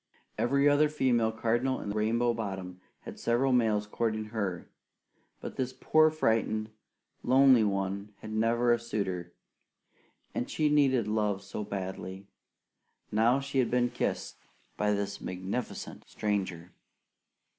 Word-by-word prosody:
Every 140 +4 +2
other 145 +1 +4
female 125 -6 +2
cardinal 120 +4 0
in 100 - -4
Rainbow 115 +3 +1
Bottom 95 -5 -5 0.2
had - - -9
several 125 +3 +2
males 110 -4 +2
courting 110 0 -2
her, 95 -6 -3 0.7
but - - -7
this 130 -1 -2
poor, 155 0 +5
frightened, 110 -7 0 0.5
lonely 130 -2 +6
one 100 0 -2
had 110 0 -7
never 115 +2 +3
a 120 - +1
suitor; 95 -6 -3 1.0
and 120 - -3
she 155 -1 +1
needed 135 -6 +3
love 105 -2 0
so 100 +2 -5
badly! 95 -1 -5 0.9
Now 115 +5 +3
she 135 -1 -2
had 125 - +2
been 120 0 +1
kissed - - -3 0.4
by 105 0 +1
this 100 0 -3
magnificent 95 +7 -5
stranger! 95 -5 -2
110 Hz, 125 wpm, -30 LUFS, 100-125 Hz, 1.0 s, lonely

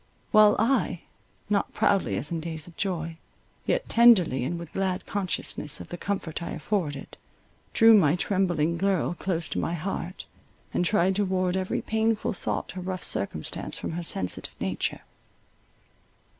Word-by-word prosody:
While 215 -2 +7
I, 225 -7 +1 0.5
not 200 0 0
proudly 125 - +2
as 145 +9 -2
in 165 - -1
days 160 -1 -4
of 175 - -14
joy, 165 -4 -3 0.5
yet - - 0
tenderly, 200 - +5
and 170 +7 -2
with 170 -1 -9
glad 190 -1 -1
consciousness 175 -6 -2
of - - -9
the - - -5
comfort 175 -4 -3
I 170 - -4
afforded, 155 -5 -3 0.6
drew 225 0 +8
my 170 -7 +5
trembling 175 -4 +1
girl 190 -1 +1
close 175 -2 -2
to - - -2
my 170 - -1
heart, 180 +1 -4 0.5
and - - +1
tried 190 0 +2
to 205 - +2
ward 185 -1 0
every 190 0 -1
painful 220 0 0
thought 185 - -4
or - - -4
rough 185 0 -4
circumstance 80 -5 -2
from - - -4
her 170 +2 -3
sensitive 95 - -1
nature. - - -2
180 Hz, 155 wpm, -27 LUFS, 165-200 Hz, 0.6 s, drew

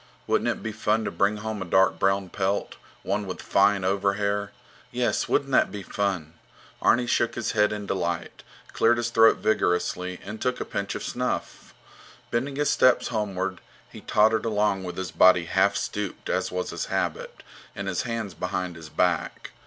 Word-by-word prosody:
Wouldn't - - +1
it - - -3
be 110 - -3
fun 110 +1 0
to - - -2
bring 100 +5 +1
home 110 -1 -4
a - - -3
dark 95 +2 +3
brown 95 -1 +1
pelt, 95 +2 -2 0.3
one 105 -1 -2
with 95 - -5
fine 100 0 +2
overhair? 100 +1 0 0.4
Yes, - - 0
wouldn't - - +1
that - - +3
be 100 -1 -6
fun? 95 -6 -2 0.5
Arni 120 +1 +4
shook 120 -1 +1
his 120 - -2
head 105 -1 +3
in 105 -1 -4
delight, 85 -3 -3 0.3
cleared 120 +1 +3
his 120 0 -1
throat 115 -1 +6
vigorously, 90 -3 0
and 105 +2 -7
took 125 - -1
a - - -3
pinch 100 0 -3
of - - -5
snuff. - - -4 0.6
Bending 135 +4 -1
his 145 +1 +1
steps 130 -4 +4
homeward, 95 -4 -2 0.3
he - - -11
tottered 110 +1 +3
along 105 -3 +1
with 90 -1 -6
his 95 -1 -4
body 90 -2 +5
half 100 +4 +2
stooped, 100 -1 -3
as - - -1
was 90 0 -3
his - - -3
habit, - - -3 0.3
and 100 0 -5
his 90 -2 -1
hands 115 -5 -4
behind 90 +1 -3
his 80 -1 -10
back. 90 +3 -1
100 Hz, 175 wpm, -26 LUFS, 95-110 Hz, 0.6 s, throat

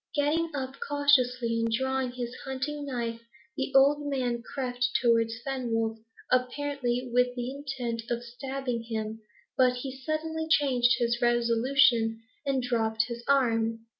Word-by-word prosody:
Getting 305 +3 +1
up 265 -1 -4
cautiously, 255 -5 +3
and 230 0 0
drawing 265 +1 0
his 245 -1 -4
hunting 285 +2 -4
knife, 235 -3 -3 0.3
the 270 0 -2
old 290 +2 +5
man 250 -4 -1
crept 250 -1 -4 0.2
towards 230 -2 +2
Fenwolf, 225 -4 -1 0.3
apparently 255 -1 0
with 250 0 +3
the 245 0 -3
intent 250 -5 -4
of 240 0 -2
stabbing 250 0 -4
him, 220 -1 -4 0.3
but 255 -1 +4
he 260 +1 -5
suddenly 315 +3 -3
changed 255 -6 +4
his 235 0 0
resolution, 235 -1 +3 0.3
and 265 -2 +1
dropped 220 -3 +1
his 235 0 -6
arm. 230 -4 +2
250 Hz, 135 wpm, -28 LUFS, 235-275 Hz, 0.3 s, old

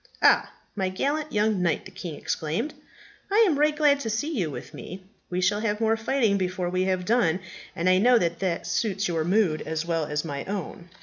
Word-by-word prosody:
"Ah, - - +5 0.2
my 190 -2 0
gallant 290 +10 -1
young 210 -2 +1
knight," 170 -3 0
the 190 - -10
king 180 -4 -6
exclaimed, 160 - -2 0.6
"I 440 +3 +6
am 300 -6 +1
right 300 0 +3
glad 295 -2 +4
to 230 - -3
see 290 +9 -2
you 180 -9 0
with 145 - -8
me. 185 +1 -8 0.3
We 180 0 -1
shall 205 +3 +2
have 210 -1 -1
more 225 0 +2
fighting 225 -3 +1
before 180 -1 -2
we 185 +1 +1
have 185 -1 0
done, 185 -6 +2 0.4
and 170 - -1
I 185 0 +5
know 245 +4 +5
that 170 -5 0
that 180 -3 -1
suits 200 +2 0
your 165 -2 0
mood 180 -3 +2
as 160 0 -3
well 165 -2 0
as 150 +2 -2
my 140 -3 -4
own." 185 -3 -5
190 Hz, 210 wpm, -26 LUFS, 175-225 Hz, 0.6 s, I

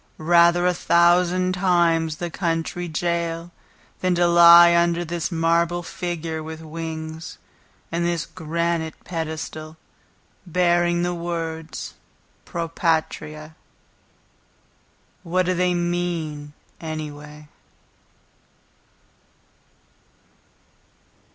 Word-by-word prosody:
Rather 170 +2 +4
a 180 - +3
thousand 175 +2 +3
times 170 -4 +2
the 170 +2 -5
county 170 +1 -2
jail 170 +1 -2 0.5
Than 185 -1 +1
to 175 0 +3
lie 170 0 +8
under 170 0 +2
this 170 +2 -3
marble 170 +1 +1
figure 165 -2 -4
with 160 0 -7
wings, 160 +1 -7 0.5
And 170 +1 -1
this 170 -1 -1
granite 165 0 -2
pedestal 160 -1 -5 0.7
Bearing 175 0 +2
the 175 0 -1
words, 165 -2 -5 0.5
"Pro 170 -1 -4
Patria." 155 -2 -2 1.7
What 180 +2 0
do 185 - +1
they 180 0 +1
mean, 170 -4 -3 0.3
anyway? 150 -1 -7
170 Hz, 85 wpm, -23 LUFS, 160-175 Hz, 1.7 s, lie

